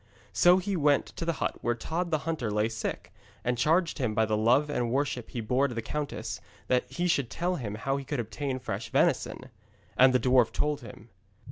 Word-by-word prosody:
So 175 - +6
he 190 +1 -2
went 145 -3 +3
to 165 - -3
the 170 - +1
hut - - -2
where 120 0 0
Tod 170 +8 -3
the 160 - +2
hunter 160 -9 -2
lay 105 +1 +1
sick, 115 -1 -5 0.3
and 125 +1 0
charged 165 +7 +2
him 115 -5 -1
by 110 - +3
the 110 0 0
love 120 +7 +3
and 125 -5 -1
worship 130 -2 -1
he 120 - -4
bore 125 +5 +2
to 125 - -7
the 115 - -2
countess, 150 +4 -4 0.3
that 125 -1 +1
he 175 0 -1
should 140 -8 +1
tell 180 +1 -1
him 105 -5 -4
how 135 +5 -1
he 140 - -5
could 140 0 -3
obtain 130 +4 -3
fresh 110 -3 -5
venison. 130 0 0 0.4
And 130 +1 +6
the 125 - +3
dwarf 125 -1 +4
told 150 -1 -1
him. 115 0 -12
130 Hz, 215 wpm, -28 LUFS, 115-150 Hz, 0.4 s, So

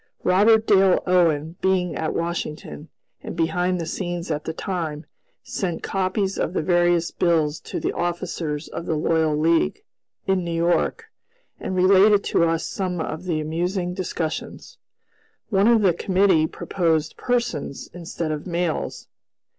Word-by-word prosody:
Robert 215 +4 +4
Dale 195 -3 +4
Owen 165 -3 +2
being 180 -3 +1
at 160 - -2
Washington, 165 -2 -4 0.3
and - - -7
behind 180 +2 0
the 165 - -3
scenes 175 0 -4
at 150 0 -3
the - - -2
time, 160 -3 -4 0.4
sent 175 -4 -3
copies 190 +1 -1
of 175 - -1
the 160 - -1
various 175 -1 +2
bills 160 -3 +1
to - - -5
the - - -2
officers 170 -3 -3
of 170 - -7
the 160 - 0
Loyal 155 0 +1
League, 160 - +1 0.4
in 190 -1 +1
New 170 - -4
York, 170 +1 0 0.5
and 190 - -4
related 195 +3 +5
to - - +2
us 165 0 0
some 185 -3 -3
of 160 +2 -4
the 165 -4 -1
amusing 175 +4 -2
discussions. 170 -3 -5 0.7
One 195 +1 +4
of 230 -2 +4
the 185 -3 +4
committee 185 -3 +3
proposed 160 -4 -1
"persons" 235 - -2
instead 170 -2 -4
of 150 +3 -4
"males." 170 -2 -2
175 Hz, 145 wpm, -23 LUFS, 160-185 Hz, 0.7 s, related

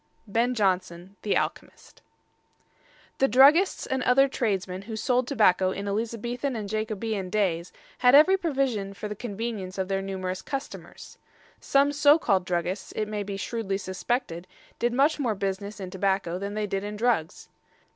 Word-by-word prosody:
BEN 230 +4 0
JONSON, 185 -2 -1
The 205 - +1
Alchemist. - - -5 1.2
The 270 - +4
druggists 285 - +5
and 265 0 -2
other 270 +2 +4
tradesmen 195 -7 -2
who 220 +2 -7
sold 250 +3 0
tobacco 190 -8 +3
in 200 +2 -4
Elizabethan 235 +5 -3
and 215 -3 -4
Jacobean 215 -2 -3
days 180 -4 0 0.3
had 250 +1 +6
every 315 +7 +7
provision 265 - -1
for 205 +3 -5
the 210 - -5
convenience 205 -3 -5
of 190 0 -2
their 195 0 0
numerous 185 -1 -4
customers. 275 -1 -8 0.4
Some 280 +1 +2
so 290 +1 +5
called 195 - +1
druggists, 180 +2 -2
it 215 - -1
may 210 -1 -3
be 200 -1 -5
shrewdly 200 -2 -3
suspected, 190 -1 -3 0.3
did 240 0 +1
much 280 +6 +2
more 240 -6 0
business 200 +1 -4
in 185 -2 -6
tobacco 190 -2 -1
than 200 +1 -5
they 215 0 -1
did 195 -1 -3
in 210 +1 -5
drugs. 210 -7 -1
210 Hz, 155 wpm, -26 LUFS, 190-245 Hz, 1.2 s, every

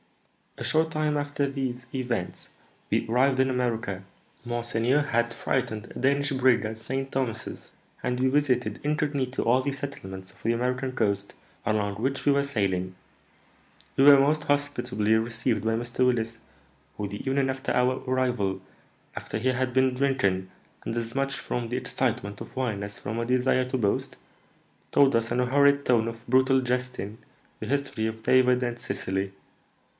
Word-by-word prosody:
"A - - -5
short 160 +1 +2
time 155 -1 0
after 145 -1 -1
these 130 -2 -3
events 125 -8 -3 0.4
we - - +1
arrived 130 +3 +3
in 130 0 +4
America. 115 -6 -1 0.4
Monseigneur 120 +3 +1
had 120 -4 0
freighted 120 -5 -2
a - - -5
Danish 140 +2 +2
brig 130 -3 +3
at 110 +1 -4
St. 135 +4 -4
Thomas's, 115 -4 -3 0.3
and 125 0 -1
we 130 - +3
visited 125 -6 +1
incognito 145 -3 0
all 125 +3 +4
the 140 +2 -1
settlements 115 -10 -7
of - - -22
the 115 - +2
American 125 +2 -1
coast 100 -5 0 0.3
along 105 -2 0
which 135 +7 -2
we 145 - +5
were 140 0 +3
sailing. 95 -8 -1 1.0
We 135 - +4
were 140 -1 +9
most 150 +2 +2
hospitably 125 -7 +1
received 115 +1 0
by 110 0 +1
Mr. 120 +2 0
Willis, 115 -2 0 0.6
who, 105 - -2
the 100 +1 -6
evening 135 0 +1
after 130 +1 -2
our 125 +1 +1
arrival, 125 -7 0 0.6
after - - -4
he 130 - +1
had 130 0 0
been 130 0 +3
drinking, 125 -9 +1 0.3
and 115 - -3
as 115 +1 -3
much 135 0 0
from 120 -2 -3
the 125 - -1
excitement 120 -5 -2
of - - -9
wine 115 -6 -1
as 100 0 -7
from 110 +3 -4
a 115 - -1
desire 130 +1 +2
to 130 +1 -2
boast, 105 -5 -1 0.7
told 140 -3 +5
us, 115 0 0
in 120 - +1
a 125 - +3
horrid 140 +2 +4
tone 115 -2 +3
of 115 +1 -7
brutal 130 +2 +4
jesting, 125 -4 -3 0.4
the 110 - -5
history 135 -4 -1
of 110 0 -6
David 125 -1 +4
and 120 -1 -3
Cecily. 95 -4 -2
125 Hz, 165 wpm, -27 LUFS, 115-135 Hz, 1.0 s, were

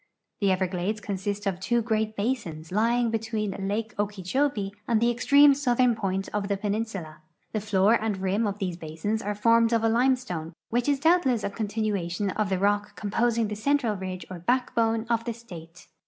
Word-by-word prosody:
The 200 -2 +2
Everglades 185 +2 -1
consist 205 0 -4
of 190 -3 -1
two 240 +5 +1
great 220 -1 -1
basins 200 -9 -3
lying 230 +3 +2
between 220 -2 -2
lake 205 +3 -3
Okeecliobee 205 +2 -1 0.2
and 230 -2 +3
the 235 +1 +3
extreme 280 +4 +6
southern 250 -3 +2
point 195 -3 -2
of 210 -1 -1
tbe 200 -1 -1
peninsula. 200 -6 -3 0.3
The 215 - -2
floor 205 0 +3
and 215 -3 -1
rim 195 +4 0
of 200 0 -3
these 185 -4 -3
basins 165 +7 -3
are 205 +1 -3
formed 230 +2 +4
of 225 -1 +2
a 225 - +3
limestone 230 -9 0 0.2
which 240 +4 +1
is 285 -1 +2
doubtle.ss 290 - +3
a - - -2
continuation 205 -3 -2
of 210 0 -1
the 190 - +1
rock 205 +2 0
composing 230 +2 0
tbe 210 0 -5
central 250 -2 +1
ridge 185 -2 -6
or 180 - -6
backbone 230 +1 +1
of 230 -1 +1
tbe 235 -1 -4
state. 175 -7 -12
215 Hz, 180 wpm, -26 LUFS, 195-230 Hz, 0.3 s, extreme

